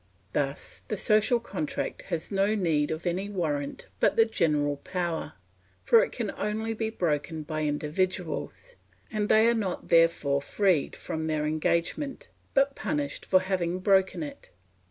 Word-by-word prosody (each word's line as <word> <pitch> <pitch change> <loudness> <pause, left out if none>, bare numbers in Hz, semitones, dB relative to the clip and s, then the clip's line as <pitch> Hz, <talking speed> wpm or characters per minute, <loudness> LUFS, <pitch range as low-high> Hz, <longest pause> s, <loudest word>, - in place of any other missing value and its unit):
Thus 140 -1 -2
the 215 - -2
social 215 +4 +3
contract 280 +4 -4
has 170 0 -3
no 200 +2 +2
need 160 -7 +1
of 160 +2 -4
any 185 +3 -1
warrant 150 -8 -2
but - - +3
the 225 - +6
general 150 -9 +1
power, 175 -1 -3 0.5
for 465 0 +6
it - - -3
can - - -3
only 220 +2 -2
be 220 0 -2
broken 160 -5 -1
by 155 0 -2
individuals, 180 - -2 0.3
and 210 -1 -1
they 220 +1 +6
are 235 - +5
not 200 -6 -3
therefore 165 -4 +4
freed 180 0 +1
from 160 0 -4
their 155 -1 0
engagement, 170 - -1 0.3
but 275 0 +4
punished 145 -9 -3
for 185 - +5
having 185 -2 -1
broken 190 -2 +2
it. 145 - -9
180 Hz, 150 wpm, -28 LUFS, 155-210 Hz, 0.5 s, the